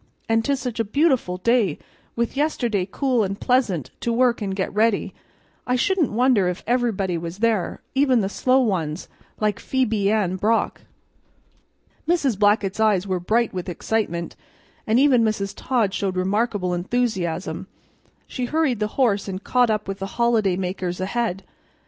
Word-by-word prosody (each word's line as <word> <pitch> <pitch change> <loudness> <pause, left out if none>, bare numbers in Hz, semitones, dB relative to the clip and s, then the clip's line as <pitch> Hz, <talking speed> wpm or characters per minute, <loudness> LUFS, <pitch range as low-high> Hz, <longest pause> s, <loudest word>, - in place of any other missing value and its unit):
An' 225 0 +2
'tis 275 +3 0
such 245 -3 -4
a - - +3
beautiful 250 - +1
day, 220 -5 +2 0.4
with 235 +2 -1
yesterday 240 -10 0
cool 255 -5 +1
and 195 0 -3
pleasant 220 - +1
to 235 - -1
work 240 0 +2
an' 200 - -2
get 190 0 -2
ready, 215 0 +1 0.5
I 250 - +2
shouldn't 350 +4 +1
wonder 235 -4 +3
if 180 0 -3
everybody 215 -8 0
was 170 +2 -6
there, 220 -3 0
even 265 -3 +3
the 190 - 0
slow 255 +6 +2
ones 175 -8 -1 0.3
like 210 -1 0
Phebe 225 -6 0
Ann 195 -4 +1
Brock." 220 +4 0 1.3
Mrs. 285 - +1
Blackett's 205 -1 +2
eyes 210 -4 +3
were 185 -2 -1
bright 225 +6 +1
with 185 0 -4
excitement, 175 -2 -2 0.5
and 220 +2 +3
even 265 -4 +5
Mrs. 205 -2 -1
Todd 230 -7 0
showed 195 -2 -2
remarkable 195 0 0
enthusiasm. 185 -3 -2 0.6
She 255 - -4
hurried 290 -4 0
the 210 - 0
horse 215 -7 +2
and 190 0 -5
caught 250 -2 +2
up 215 -1 -1
with 195 0 -4
the 195 - -3
holiday 225 -6 +2
makers 180 -1 -3
ahead. 195 0 -2
215 Hz, 155 wpm, -23 LUFS, 190-245 Hz, 1.3 s, even